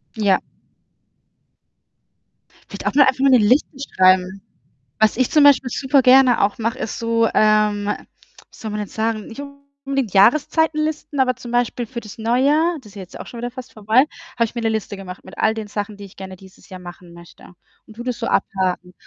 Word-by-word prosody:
Ja. 205 -3 +2 2.3
Vielleicht - - -7
auch - - 0
nur 285 - +6
einfach 260 0 +1
mal 275 - +4
'ne 255 - +6
Liste 255 +6 +2 0.2
schreiben. 185 +1 +3 0.6
Was 220 0 +3
ich, 255 0 +1
zum 300 -2 +4
Beispiel, 270 -3 +5
super 270 +1 +2
gerne 255 -1 +5
auch 200 +1 0
mache, 230 0 -2
ist - - -5
so 230 0 +1
ähm, 210 -1 +2
wie 210 - -3 0.5
soll 220 - -7
man 210 0 -4
denn 205 - -5
sagen? 220 -1 -3
Nicht 235 +5 -8 0.4
unbedingt 275 -6 -2
Jahreszeitenlisten, 305 +6 +2
aber, 255 -2 +2
zum 250 -2 -10
Beispiel, 240 0 -1
für 235 +1 -7
das 220 +1 -12
Neujahr 280 +9 +2
das 215 - -15
ist - - -19
jetzt 190 -3 -10
auch - - -8
schon 240 - -10
wieder 240 +1 -4
fast 255 0 -11
vorbei, 220 +5 +2 0.3
habe 235 - +2
ich 225 - -6
mir 240 - -3
'ne 225 - +1
Liste 220 -2 -4
gemacht, 185 -1 -10
mit - - -14
all 220 - +2
den 220 -2 -6
Sachen, 205 0 -5
die 200 - -11
ich 195 - -15
gerne 190 -1 -9
dieses 190 0 -18
Jahr 185 -1 -10
machen 175 0 -12
möchte 170 0 -15 0.4
und 220 - -15
tue 240 - -8
das 250 -1 -3
so 230 - -4
abhaken. 185 -2 -1
225 Hz, 200 wpm, -20 LUFS, 205-255 Hz, 2.3 s, nur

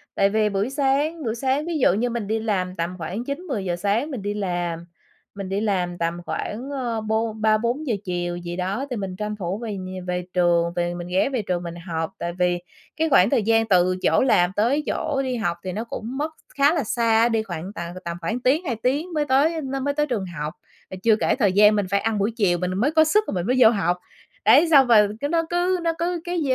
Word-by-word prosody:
Tại 195 - +3
vì 215 0 +2
buổi 200 +4 -1
sáng, 285 +4 0
buổi 225 -2 -2
sáng 265 +4 0
ví 335 -1 -2
dụ 250 - +4
như 235 +5 0
mình 230 -3 -3
đi 220 +1 0
làm, 190 -4 -1
tầm 170 +1 -3
khoảng 180 +7 -4
9:00-10:00 265 - -3
sáng 205 - -1
mình 250 - -4
đi 205 +1 -2
làm, 175 -4 -3 0.5
mình 195 -2 -6
đi 200 +2 -1
làm 180 -5 -1
tầm 170 0 -1
khoảng, 245 +6 -4
ờ, 240 -5 -2
bôn 220 0 -2
3:00-4:00 235 +5 +1
chiều 175 -1 -2
gì 175 0 -6
đó 190 +8 -2
thì 250 - -3
mình 195 -4 -4
tranh 210 +2 -4
thủ 190 -1 -3
về 230 -2 -5
nh 185 -1 -7
về 180 0 -2
trường, 170 -1 +2
về 175 0 -1
mình 175 0 -6
ghé 185 +8 +1
về 260 -4 -1
trường 180 -3 -2
mình 170 -1 -6
học, 160 -1 -2
tại 170 0 -4
vì 180 -1 +2 0.4
cái 320 0 +1
khoảng 220 -8 +5
thời 245 -5 +2
gian 225 +1 +3
từ 185 -2 +3
chỗ - - +3
làm 180 -9 +3
tới 255 +8 +2
chỗ 285 -3 -1
đi 255 -1 -2
học 175 -6 -1
thì 185 - -3
nó 215 +4 -3
cũng 235 +2 -6
mất 300 +3 -2 0.2
khá 285 +2 +4
là 320 -5 0
xa, 230 0 +2
đi 225 -2 +1
khoảng 180 0 -6
tận 170 0 -5
tầm 170 0 -4
khoảng 220 +9 -2
tiếng 280 +8 +1
2 250 -6 -1
tiếng 280 +10 -1
mới 300 -2 0
tới 300 +5 +2
nó 270 0 -3
mới 285 +2 -1
tới 295 +1 +1
trường 225 -8 -2
học. 155 -4 -5 0.4
À, 190 - -7
chưa 225 -2 +5
kể - - +1
thời 210 -7 +2
gian 210 +2 +6
mình 205 -2 +1
phải 200 - +3
ăn 225 -1 0
buổi 200 +3 +1
chiều 180 -5 +2
mình 180 +1 -2
mới 255 +9 +2
có 315 0 +5
sức 420 +7 +3
rồi - - -3
mình 180 +1 -2
mới 250 - +2
vô 235 - +8
học. 180 -5 0 0.5
Đấy, 335 - +6
xong 275 -4 +7
rồi 215 -3 +6
cứ 285 - 0
nó 330 +2 +1
cứ 355 +1 +1
nó 335 -1 +1
cứ 345 0 -1
cái 350 -1 -2
215 Hz, 245 wpm, -23 LUFS, 180-265 Hz, 0.5 s, vô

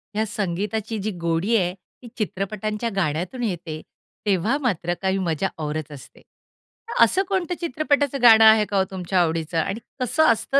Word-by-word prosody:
ह्या 220 +1 +1
संगीताची 210 +3 -3
जी 215 +2 -2
गोडी 170 +7 +1
आहे 180 -2 0
ती 195 +6 -18
चित्रपटांच्या 215 +2 -3
गाण्यातून 180 - -2
येते, 170 -6 -4 0.4
तेव्हा 205 +7 +1
मात्र 175 -8 0
काही 190 0 +1
मजा 175 0 0 0.2
औरच 150 0 -4
असते. 140 - -12
तर 460 - -4
असं 385 - +3
कोणतं 360 -3 -1
चित्रपटाचं 285 -3 0
गाणं 225 -2 +8
आहे 220 -1 +7
का 200 - 0
हो 190 - +4
तुमच्या 185 0 0
आवडीचं? 165 0 -1
आणि 195 +7 -2 0.2
कसं 260 +5 +2
असतं 270 +5 +1
200 Hz, 160 wpm, -23 LUFS, 175-235 Hz, 0.4 s, गाणं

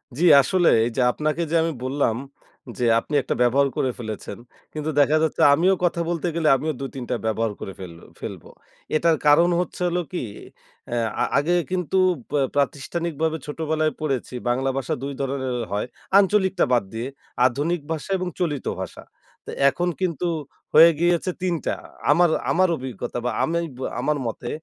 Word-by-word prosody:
জ্বি। 170 - +1 0.2
আসলে 175 +5 +2 0.2
এইযে 120 +2 -1
আপনাকে 155 +5 -2
যে - - +1
আমি 165 0 -1
বললাম 130 -3 0 0.6
যে, 125 - 0
আপনি 150 - -9
একটা - - -2
ব্যবহার 135 +3 +4
করে 130 - +1
ফেলেছেন। 110 -3 -6 0.4
কিন্তু 155 0 -3
দেখা 145 +2 +4
যাচ্ছে 160 - 0
আমিও 180 +6 +3
কথা 175 -1 +1
বলতে 175 0 -1
গেলে 165 -2 +1
আমিও 155 +4 -2
২ 135 -1 -4
৩ 130 - -5
টা 125 - +1
ব্যবহার 110 0 0
করে 95 - -6
ফেল 90 -3 -8 0.3
ফেলব। - - -7 0.5
এটার 165 +1 +3
কারণ 165 +4 +6
হচ্ছে 180 - -4
হলো 175 +1 0
কি 180 - -3 0.7
এ - - 0 0.3
আ - - +4
আগে 160 +5 +2 0.2
কিন্তু 185 0 -1 0.3
বা 145 - +1 0.2
প্রাতিষ্ঠানিকভাবে 160 +3 -1
ছোটবেলায় 155 +1 -1
পড়েছি 135 -4 -2
বাংলা 130 +2 +1
ভাষা 135 - -2
২ 140 0 -3
ধরনের 130 -2 -2 0.2
হয়। 105 +3 -1 0.3
আঞ্চলিকটা 195 -1 +2
বাদ 120 -3 +3
দিয়ে, 115 +3 -3 0.4
আধুনিক 150 +7 -1
ভাষা 160 +2 -4
এবং 185 0 -3
চলিত 150 -7 -1 0.2
ভাষা। - - -7 0.7
এখন 175 +5 -2
কিন্তু 175 -2 -1 0.5
হয়ে 165 +2 +9
গিয়েছে 175 +1 +2
৩ 180 -2 0
টা, - - 0 0.4
আমার 175 +3 +5 0.2
আমার 185 +1 +3
অভিজ্ঞতা 125 -2 -5
বা, 125 - +1
আমি 170 +1 0 0.2
বে 130 - -6 0.2
আমার 150 +3 0
মতে 120 +1 -5
150 Hz, 165 wpm, -23 LUFS, 130-170 Hz, 0.7 s, হয়ে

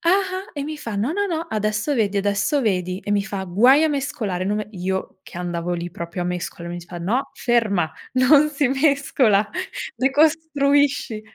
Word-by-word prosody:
ah-ah, 380 +3 0
e 285 - -4
mi 305 +1 -5
fa: 230 -6 -5
"No, 215 +8 0
no, 405 +2 0
no, 335 -2 -3
adesso 215 +6 -1
vedi, 210 -5 +1
adesso 200 +8 +1
vedi". 185 -4 -1
E 205 - -6
mi 200 -1 +2
fa: 200 -3 -4
"Guai 245 - +5
a 320 - +3
mescolare", 250 -11 -2
non 205 +2 0
me 210 - -5
io 190 0 -3
che 175 - -9
andavo 175 0 -3
lì 175 0 -4
proprio 175 0 -5
a - - -3
mescola 175 -1 -4
mi 175 - -5
diceva: 175 0 -8
"No, 240 +9 -1
ferma, 215 -9 +1 0.2
non 280 +4 +5
si 280 -2 +1
mescola. 265 -7 +2 0.5
Decostruisci". 285 -3 +2
220 Hz, 180 wpm, -22 LUFS, 190-285 Hz, 0.5 s, Guai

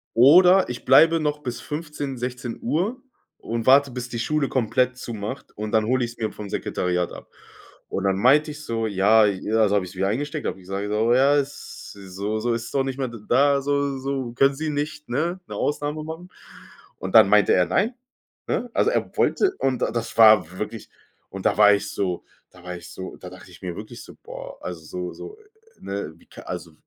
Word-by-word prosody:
oder 180 +9 +6
ich 125 - -6
bleibe 165 +5 +6
noch 150 -1 -1
bis 125 -4 -5
15, 150 -3 -5
16 125 -1 -5
Uhr 215 - -1 0.4
und 115 0 -4
warte, 140 +1 +6
bis 125 0 -6
die 120 - -4
Schule 150 +3 0
komplett 125 0 +1
zumacht 120 +1 -6
und 105 0 -5
dann 110 -1 +2
hole 125 +2 +1
ich's 120 0 -10
mir 110 -2 -2
vom 105 -1 -8
Sekretariat 90 -2 -2
ab. - - -11 0.6
Und 95 - -3
dann 95 -1 +1
meinte 145 +7 +4
ich 150 0 -10
so, 115 -4 -2
ja, 105 +2 +4
also 105 +1 +2
habe 100 -2 +1
ich's 90 +1 -11
wieder 95 +1 0
eingesteckt, 145 +8 -3
hab - - -2
ich 95 - -16
gesagt, 95 +2 -4
so: 110 +3 +2
„Ja, 135 +3 +4
es 145 0 -4
so 100 +2 -4
so, 120 +2 0
ist 115 0 -5
doch 135 - +2
nicht 135 -1 -4
mehr 130 - -1
da 140 +5 +2
so 140 0 0
so, 135 -3 -3
können 135 +2 +3
Sie 155 +3 -3
nicht 150 -1 -4
ne, 165 +8 -1
'ne - - -7
Ausnahme 145 +1 -2
machen?“ 160 +3 -8 0.7
Und 95 - -5
dann 110 -3 +8
meinte 105 -1 +5
er: 90 -1 +4
„Nein“, 205 - 0 0.5
ne? 245 - -2
Also 450 - +2
er - - -2
wollte 390 -1 +2
und 130 -2 0
das 115 0 -2
war 105 -6 +6
wirklich 105 +1 -6 0.4
und 95 0 -8
da - - +2
war 105 -1 +7
ich 100 - -1
so 90 -3 -2 0.3
da 90 -1 -18
war 90 0 -6
ich 85 0 -12
so 95 +1 -8
da 90 - -10
dachte 90 0 -14
ich 85 - -16
mir 90 -2 -4
wirklich 110 +4 -9
so, - - -14
boah, - - -9
also 90 -3 -6
so 90 +2 -5
so, 425 - -10 0.4
ne, 100 -5 -5
wie - - -23
kann - - -13
also 90 -2 -6
120 Hz, 205 wpm, -23 LUFS, 100-145 Hz, 0.7 s, dann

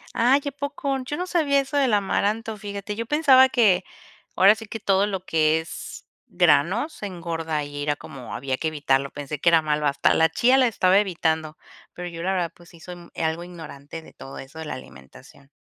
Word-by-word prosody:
Ay, 255 +5 +4
¿a - - -2
poco? 280 -1 -3
Yo 290 +3 -4
no 360 - -2
sabía 310 -6 +2
eso 275 +2 -4
del 275 -4 +3
amaranto, 210 +2 -1
fíjate, 205 0 -6
yo 230 +1 -4
pensaba 265 -3 +5
que, 205 -8 +3 0.5
ahora 195 +2 +7
sí 220 0 -10
que 225 - -6
todo 200 -1 +2
lo 190 -2 -4
que 160 -1 +2
es 160 - -9 0.2
granos 180 - +2
engorda 165 -5 -3
y 145 0 -7
era 145 0 0
como 135 -4 -9
había 130 0 -3
que 160 - -2
evitarlo, 140 -3 0
pensé 145 0 -6
que 170 - +4
era 165 -1 +4
malo, 150 -1 0
hasta 140 - +2
la 160 0 +3
chía 245 - +3
la 255 - +4
estaba 195 -3 +3
evitando, 160 -5 -1 0.4
pero 175 0 -6
yo, 165 -1 -8
la 190 +3 -1
verdad, 175 -3 -1
pues 175 0 -18
sí 170 - -17
soy 180 +2 -9
mu 175 -1 -14
algo 160 +1 -2
ignorante 160 -3 -10
de - - -16
todo 135 - -11
eso 140 +4 -10
de 160 - -6
la - - -5
alimentación. 65 - -15
175 Hz, 205 wpm, -24 LUFS, 155-225 Hz, 0.5 s, ahora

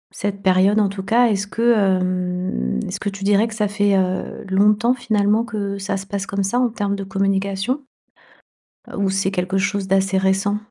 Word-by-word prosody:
cette 200 0 -3
période 190 +2 +3
en 205 - +3
tout 195 -1 -6
cas. 235 +5 +3
Est-ce 205 -2 -1
que, 235 +3 +2
hem, 185 - 0
est-ce - - -5
que 205 - -1
tu 195 0 -7
dirais 205 +2 +3
que 220 - -8
ça 210 -2 0
fait, 205 -1 +1
heu, 185 +1 -2
longtemps 210 +5 +3
finalement 215 -2 +1
que 205 -3 -4
ça 195 0 -2
se 195 - -7
passe 200 0 -4
comme 200 -1 -2
ça 240 +6 0
en 250 - +2
termes 205 -3 -2
de 200 - -5
communication? 195 +6 -1 1.1
Heu, - - -8
ou 195 -1 +1
c'est 195 0 0
quelque 185 0 -1
chose 200 0 -1
d'assez 195 0 +2
récent? 195 +2 +1
200 Hz, 195 wpm, -20 LUFS, 190-210 Hz, 1.1 s, période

